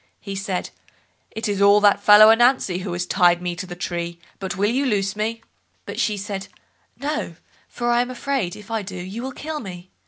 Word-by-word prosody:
He 200 -1 -7
said, 190 -2 -3 0.6
"It 220 - -4
is 200 -1 -1
all 200 +1 +6
that 205 -1 +4
fellow 215 +1 +8
Ananzi 240 -5 +3
who 185 - -5
has 175 +1 -2
tied 175 -1 +3
me 175 -1 -3
to 185 +2 -6
the 175 - -7
tree, 170 -1 -4 0.2
but 190 -1 -4
will 205 +3 +2
you 265 +4 +1
loose 200 -6 0
me?" 225 +2 -3 0.4
But - - -6
she 210 -1 +1
said, 195 -1 -5 0.5
"No, 280 - -3 0.3
for 240 0 -2
I 240 0 +4
am 245 - -3
afraid, 255 -7 -2
if 210 +2 -12
I 225 -1 0
do, 190 -1 -8
you 190 +6 -6
will 265 +1 -4
kill 305 +3 -5
me." 185 -5 -9
205 Hz, 210 wpm, -22 LUFS, 185-230 Hz, 0.6 s, fellow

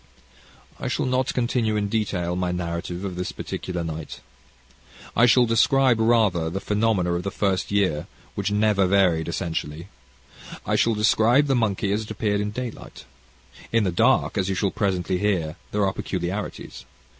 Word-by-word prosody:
"I - - -4
shall - - -1
not 130 +1 0
continue 120 -3 0
in 105 -1 0
detail 100 -5 -1
my 90 0 -1
narrative 90 +1 -4
of 95 -2 -4
this 90 0 -3
particular 90 -2 -5
night. 80 -1 -6 1.0
I 115 +2 +5
shall 120 +2 +5
describe, 120 +2 +3
rather, 110 -8 +2
the 95 +4 -3
phenomena 105 -4 +1
of 85 - -1
the 100 - -3
first 95 -1 -1
year, 95 -7 0 0.3
which - - -2
never 105 -2 +2
varied, 90 -5 +2
essentially. 85 0 -4 0.8
I - - 0
shall 115 -1 +2
describe 110 +6 +4
the 140 - +1
monkey 105 -5 0
as 105 +2 0
it 110 - -9
appeared 105 -1 -1
in 105 - -2
daylight. 120 +2 -7 0.7
In 115 -1 +3
the 95 - 0
dark, 110 +3 +2
as 95 0 0
you 95 - 0
shall 100 0 0
presently 95 -3 -1
hear, 90 -6 0
there 105 -1 +1
are 95 - 0
peculiarities. 95 +3 -5
100 Hz, 165 wpm, -24 LUFS, 90-110 Hz, 1.0 s, I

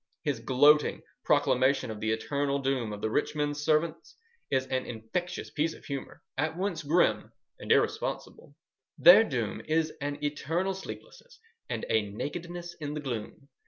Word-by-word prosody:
His 145 -7 -1
gloating 145 +5 +4 0.2
proclamation 130 -1 +2
of 105 - -7
the 110 - -1
eternal 140 +5 0
doom 135 -5 -1
of 105 0 -6
the 110 - 0
rich - - 0
men's 145 0 -1
servants 160 +1 0 0.3
is 130 -1 +1
an 130 -1 -2
infectious 120 +11 -4
piece 160 +2 -1
of - - -16
humour, 140 -2 -6 0.2
at 155 +3 0
once 185 -3 -2
grim 160 +4 +2 0.3
and - - -4
irresponsible:— 145 - 0 0.4
Their 185 +6 +9
doom 120 - -3
is 160 0 0
an 145 0 -2
eternal 165 +6 -1
sleeplessness 465 - -10 0.3
and - - -3
a 110 - +3
nakedness 170 - -5
in 150 -1 -4
the - - -2
gloom.... 130 -1 -6
145 Hz, 155 wpm, -29 LUFS, 130-165 Hz, 0.4 s, Their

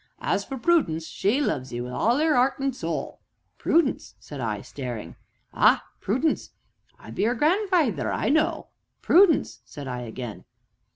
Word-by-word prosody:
"As - - 0
for 270 - -6
Prudence 235 - +1
she 210 - 0
loves 135 - -1
'ee 120 - -4
wi' 125 +1 -5
all 235 - +1
'er 315 0 +3
'eart 260 0 +3
an' 270 -1 0
soul!" 165 -9 -4 0.4
"Prudence?" 320 -5 +1
said 145 -3 -8
I, 110 -3 -2
staring. 125 -6 -7 0.4
"Ah! - - +4
Prudence 260 +11 0 0.5
I - - -12
be 215 - 0
'er 240 - +1
grandfeyther, 310 - +1
an' - - -2
I - - 0
know." 310 +3 +1 0.3
"Prudence!" 330 - +4
said 140 +3 -9
I 125 -1 -4
again. 120 -1 -7
225 Hz, 160 wpm, -25 LUFS, -, 0.5 s, Ah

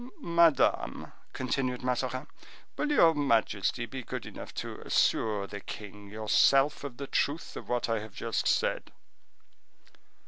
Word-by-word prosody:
"Madame," 170 - +2 0.2
continued 130 -1 -2
Mazarin, 130 +1 -1 0.5
"will 300 - -1
your 165 - +6
majesty 120 -5 +1
be 130 +2 -6
good 125 -2 -6
enough 105 - -9
to - - -6
assure 105 -3 +1
the 100 +1 -7
king 100 0 -9
yourself 135 +8 +3
of 135 -4 -6
the 140 - -5
truth 145 +3 -1
of - - -8
what 120 -1 0
I 115 -1 0
have 105 -1 -10
just 115 +1 -1
said?" - - 0
125 Hz, 135 wpm, -29 LUFS, 110-140 Hz, 0.5 s, your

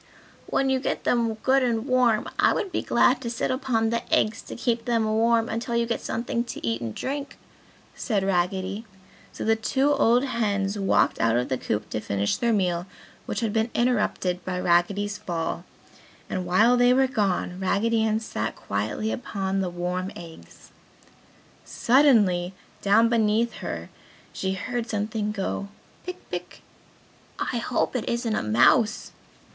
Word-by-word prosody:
"When 270 0 +1
you 265 - +2
get 265 - -2
them 230 -2 +1
good 270 +1 +4
and 235 -2 0
warm, 250 -4 +2
I - - +5
would 385 - -2
be - - -1
glad 250 +2 +3
to 235 - -3
sit 235 +1 -1
upon 235 -4 0
the 235 0 0
eggs 215 +1 +2
to - - -9
keep 235 -1 -1
them 230 -2 +1
warm 225 +1 +2
until 235 +1 -3
you 235 0 +2
get 230 -1 -2
something 235 +1 -2
to - - -7
eat 115 +1 -1
and 115 -2 -5
drink!" 280 +1 -4 0.6
said 210 -6 -1
Raggedy. 190 +2 -1 0.5
So - - -6
the 225 0 +4
two 265 +6 +1
old 245 -3 +3
hens 205 -6 -1
walked 195 - +2
out 115 0 +3
of 125 - -1
the 130 - 0
coop 105 0 -2
to - - -1
finish 100 -1 -1
their 235 -1 +1
meal 180 -4 0 0.4
which - - -2
had 220 -3 -1
been 220 +1 +1
interrupted 210 -7 0
by 180 -1 -3
Raggedy's 200 +4 +1
fall 170 0 -3 0.7
and 185 -1 -2
while 220 +8 +4
they 245 0 +5
were 265 0 +4
gone, 195 -7 -1
Raggedy 220 +4 +1
Ann 220 0 +1
sat 110 - -4
quietly 105 - -2
upon 195 -5 -2
the 190 -2 -1
warm 180 +2 -3
eggs. 165 - -13 0.9
Suddenly 210 -9 +3 0.3
down 210 +3 +4
beneath 230 0 +2
her - - -5 0.4
she 190 0 -2
heard 235 +4 -4
something 210 0 -2
go, 200 -1 -3 0.4
"Pick, 365 0 -8
pick!" - - -6 0.7
"I 245 - -2
hope 235 +2 -1
it 240 - -2
isn't 235 -2 -1
a - - 0
mouse!" 130 - +3
220 Hz, 160 wpm, -25 LUFS, 185-235 Hz, 0.9 s, I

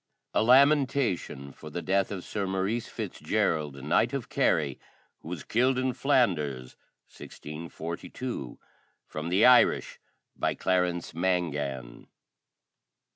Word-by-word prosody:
] - - -56
A - - +3
LAMENTATION 130 - +3
For 75 - -11
the 85 +3 -5
Death 95 0 +1
of 95 -3 -5
Sir 100 -2 -3
Maurice 95 +5 -1
Fitzgerald, 75 -3 -1
Knight, - - +2
of - - -4
Kerry, 70 -4 +1 0.4
who - - -14
was 85 -2 -5
killed 125 +3 +2
in 130 0 0
Flanders, 75 - 0 0.4
1642. 80 - -7 0.5
FROM 75 +2 -5
THE 95 +4 +4
IRISH, 125 -1 +5 0.4
BY - - -1
CLARENCE 90 -2 0
MANGAN. 75 -8 -2
90 Hz, 115 wpm, -28 LUFS, 75-120 Hz, 0.5 s, IRISH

